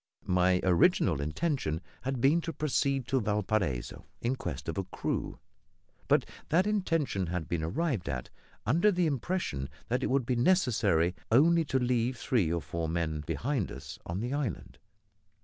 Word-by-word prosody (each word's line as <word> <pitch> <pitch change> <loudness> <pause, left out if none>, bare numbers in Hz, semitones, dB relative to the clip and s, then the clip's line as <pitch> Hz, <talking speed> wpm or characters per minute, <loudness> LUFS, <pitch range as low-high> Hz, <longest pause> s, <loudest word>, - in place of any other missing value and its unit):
My 90 0 +3
original 85 -5 +3
intention 80 - -1 0.2
had 135 0 -2
been 150 +6 +4
to 165 0 -4
proceed 135 -2 0
to 135 -1 +2
Valparaiso 105 - -1
in 120 +3 0
quest 85 - -5
of 80 +3 -2
a - - 0
crew, 95 - -3 0.7
but - - +4 0.2
that 175 +5 +3
intention 165 - 0
had 85 -2 -3
been 85 -2 -1
arrived 110 - -1
at 65 -1 -4 0.3
under 170 - +4
the 180 -2 +1
impression 140 - -2 0.2
that 125 +2 +1
it - - 0
would 130 -2 +1
be 125 - 0
necessary 120 - +3 0.2
only 165 +7 +5
to 135 -2 0
leave 125 -1 +1
three 110 -9 +1
or 85 -1 -1
four 85 -1 -3
men 80 -2 -1
behind 130 -6 -1
us 70 +4 -8
on 85 +4 -3
the 120 +3 -2
island. 140 - -3
120 Hz, 160 wpm, -30 LUFS, 85-140 Hz, 0.7 s, only